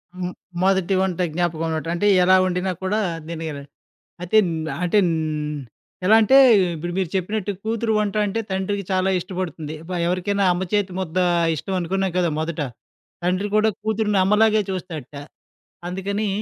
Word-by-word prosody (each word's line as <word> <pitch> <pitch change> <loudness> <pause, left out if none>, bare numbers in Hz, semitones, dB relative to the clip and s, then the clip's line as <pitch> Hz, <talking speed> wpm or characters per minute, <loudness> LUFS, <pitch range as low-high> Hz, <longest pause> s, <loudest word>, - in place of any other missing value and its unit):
హ్మ్. 180 0 -4 0.3
మొదటి 190 0 +2
వంట 185 -2 -1
జ్ఞాపకం 165 -1 -1
అన్నమాట. 160 0 -3
అంటే 205 +4 +1 0.2
ఎలా 185 +1 +6
వండినా 185 +1 -1
కూడా, 210 +3 0 0.3
తినగల 160 -3 -5 0.6
అయితే 180 +5 +3
న్ - - -2 0.3
అంటే 180 +4 +2
న్ 165 - +1 0.9
ఎలా 220 - +7
అంటే 225 +5 +5 0.4
ఇప్పుడు 175 +2 -5
మీరు 185 - 0
చెప్పినట్టు 200 +2 -1
కూతురు 225 0 -1
వంట 205 -2 -1
అంటే 205 +3 -2
తండ్రికి 190 +1 -2
చాలా 190 0 +2
ఇష్టపడుతుంది. 170 -4 -5
ప - - -10 0.2
ఎవరికైనా 195 +3 0
అమ్మ 180 +1 -2
చేతి 205 -3 +1
ముద్ద 185 -2 -4 0.4
ఇష్టం 190 +6 -4
అనుకున్నాం 190 +1 -1
కదా! 175 - +2
మొదట. 160 0 -3 0.6
తండ్రి 185 +3 0
కూడా 220 +1 +4
కూతురుని 215 -2 0
అమ్మలాగే 215 +1 +4
చూస్తాడట. 165 -7 -6 0.7
అందుకని 200 +3 -2
185 Hz, 145 wpm, -22 LUFS, 175-205 Hz, 0.9 s, ఎలా